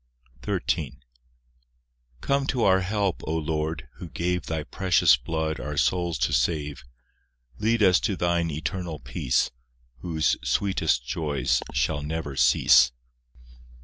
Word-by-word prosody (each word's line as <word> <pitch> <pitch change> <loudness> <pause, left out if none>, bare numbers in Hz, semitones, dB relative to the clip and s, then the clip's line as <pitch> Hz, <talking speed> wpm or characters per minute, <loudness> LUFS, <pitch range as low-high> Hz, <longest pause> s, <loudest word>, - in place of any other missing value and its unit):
XIII - - -2 1.3
Come 140 0 0
to 125 -5 0
our 95 -1 +5
help, 100 0 -1
O 80 - -1
Lord, 80 -2 -3
who - - -8
gave 90 +1 -2
Thy 80 -1 -2
precious 90 -4 +3
blood 80 +5 -3
our 75 +3 -5
souls 85 +1 +1
to 75 - -3
save; 75 +1 -1 0.8
Lead 115 0 +2
us 95 -2 +5
to 100 - -1
Thine 85 -1 0
eternal 85 +2 -4
peace, 60 -2 -1 0.5
Whose 80 -1 0
sweetest 95 -11 0
joys 75 -1 -1
shall 75 -2 0
never 75 -2 -4
cease. 65 -1 +5
80 Hz, 120 wpm, -25 LUFS, 75-95 Hz, 1.3 s, our